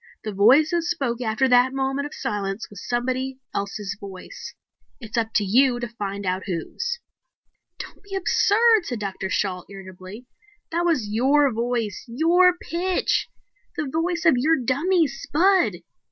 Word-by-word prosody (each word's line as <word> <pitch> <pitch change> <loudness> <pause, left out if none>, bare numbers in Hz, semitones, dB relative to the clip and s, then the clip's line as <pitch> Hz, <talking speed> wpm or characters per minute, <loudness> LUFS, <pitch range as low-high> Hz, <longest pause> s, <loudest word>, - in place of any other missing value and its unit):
The 215 - -4
voice 250 +11 +5
that 345 -1 +1
spoke 275 -8 -2
after 230 +3 +1
that 250 +1 +4
moment 270 +1 -1
of 295 - -12
silence 200 +1 -4
was 200 - -10
somebody 255 +2 -1 0.2
else's 200 0 -4
voice. 195 - -9 0.4
It's 225 -4 -8
up 225 -1 0
to 210 - +3
you 245 +5 +3
to 240 - -3
find 200 -3 -5
out 185 +1 -2
whose." 470 - -3 0.8
"Don't - - -9
be 400 -1 -8
absurd," 435 +2 +3
said 245 - -3
Dr. 195 -2 -4
Shalt, 185 -1 -2
irritably. 195 +3 -11 0.5
"That 340 +1 0
was 300 -11 +1
your 270 +5 +3
voice, 230 -3 -2
your 345 +8 +3
pitch. 355 +2 -1 0.5
The 320 - -1
voice 330 +4 -2
of 325 -6 +5
your 315 +6 +3
dummy, 315 +8 +2
Spud." 300 - +2
255 Hz, 150 wpm, -23 LUFS, 210-330 Hz, 0.8 s, voice